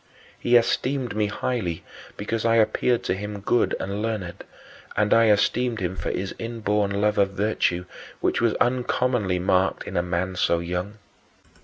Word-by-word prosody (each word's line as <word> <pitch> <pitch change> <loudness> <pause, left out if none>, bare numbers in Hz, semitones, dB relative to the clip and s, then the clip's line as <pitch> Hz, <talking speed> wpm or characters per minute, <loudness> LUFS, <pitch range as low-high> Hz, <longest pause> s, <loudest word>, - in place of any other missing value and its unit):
He 120 - +2
esteemed 125 0 +1
me 105 -1 +1
highly 100 -6 -2 0.3
because 110 +2 -2
I 115 0 +3
appeared 115 +2 +2
to - - 0
him 105 +2 -5
good 115 +4 +1
and 100 +2 -3
learned, 105 -6 -4 0.5
and 105 0 +3
I 115 0 +5
esteemed 115 +3 +2
him 90 -1 -2
for - - -3
his 95 +1 -3
inborn 105 -3 -1
love 105 0 +2
of 100 -1 +2
virtue, 95 -3 0 0.3
which - - 0
was 115 -2 +2
uncommonly 125 -5 +1
marked 95 +1 +1
in - - -7
a 85 - +3
man 90 +1 -2
so 85 - +2
young. 90 +5 -4
105 Hz, 160 wpm, -24 LUFS, 95-115 Hz, 0.5 s, I